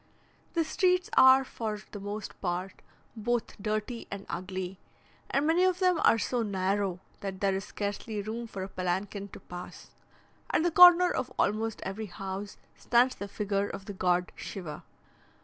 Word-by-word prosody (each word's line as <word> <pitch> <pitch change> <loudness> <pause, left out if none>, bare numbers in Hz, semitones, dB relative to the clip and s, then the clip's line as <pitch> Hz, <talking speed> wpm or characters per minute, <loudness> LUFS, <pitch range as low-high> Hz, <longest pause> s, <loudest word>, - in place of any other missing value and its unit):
The 335 - +3
streets 365 +5 +1
are 260 +1 +8
for 220 -4 -4
the 205 - -7
most 205 +2 -6
part 180 +1 -3 0.3
both 235 +1 -1
dirty 215 +3 -3
and 200 0 -6
ugly, 185 +1 -4 0.5
and 280 +2 +1
many 330 +3 +3
of 370 -1 +3
them 365 -2 +3
are - - +6
so 240 +2 0
narrow, 195 -2 0 0.2
that 195 -1 -5
there 195 -1 +2
is 190 +1 -3
scarcely 205 +1 -4
room 225 +3 -4
for 195 -4 -6
a - - -4
palanquin 190 +2 -3
to - - -11
pass. 180 0 -10 0.6
At 315 - +2
the 345 - +2
corner 355 +1 +8
of 255 -1 -2
almost 220 +1 0
every 210 +3 -4
house 195 +2 -6 0.2
stands 245 +2 +3
the 200 - -6
figure 200 0 -1
of 195 - -7
the 205 - -6
god 180 -1 +1
Shiva. 175 -6 -7
205 Hz, 165 wpm, -29 LUFS, 190-245 Hz, 0.6 s, are